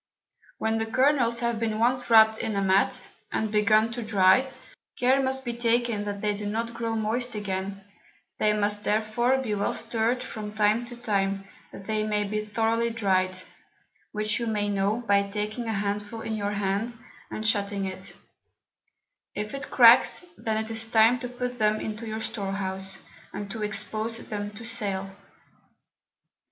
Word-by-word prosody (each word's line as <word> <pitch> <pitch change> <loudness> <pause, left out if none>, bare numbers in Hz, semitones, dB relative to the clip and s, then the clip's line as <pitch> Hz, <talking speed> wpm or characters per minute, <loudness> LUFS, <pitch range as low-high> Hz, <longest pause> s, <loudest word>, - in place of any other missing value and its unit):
When 220 0 0
the 225 - -2
Kernels 250 -1 +3
have 235 -2 0
been 220 -1 -1
once 245 +2 +1
wrapped 220 -1 +6
in 215 - -2
a 200 - +1
Mat, 195 +7 +2 0.2
and 220 -1 -1
begun 215 +1 +3
to 240 +1 -4
dry, 215 +4 +4 0.5
care 260 +2 +3
must 265 0 -2
be 240 - -2
taken 235 -2 +1
that 200 -1 -4
they 210 -1 0
do 205 0 -5
not 230 +3 -2
grow 230 -1 -2
moist 225 +2 -1
again; 195 -1 -4 0.6
they 215 - +3
must 210 0 0
therefore 220 +4 +1
be 250 -5 -2
well 205 0 0
stirr'd 235 +2 0
from 210 -4 -6
time 215 +2 +2
to 240 - -8
time, 195 -4 -1 0.2
that 195 - -10
they 215 0 0
may 210 -1 0
be 210 +1 -2
thorowly 225 +2 0
dry'd, 185 -4 0 0.7
which 215 +1 -1
you 235 - -2
may 210 -2 0
know 205 +4 0
by 200 0 +5
taking 210 +3 -3
a 225 - -1
Handful 205 +2 -2
in 220 0 -3
your 205 -1 -2
Hand, 205 +4 -1 0.3
and 215 - -5
shutting 200 -3 +1
it: 190 0 -5 1.2
if 210 0 -4
it 275 0 -5
cracks, 240 +7 +6
then 220 -7 -2
it 225 - -6
is 225 0 -1
time 225 +2 +5
to 245 0 -5
put 250 0 -4
them 215 0 +2
into 220 +1 -5
your 220 0 -4
Store 195 -3 -3
house, 190 0 -3 0.4
and 205 -1 -5
to 225 - -5
expose 215 +2 -3
them 205 -3 -5
to 215 +2 -10
sale. 195 -4 -1
215 Hz, 170 wpm, -26 LUFS, 205-230 Hz, 1.2 s, wrapped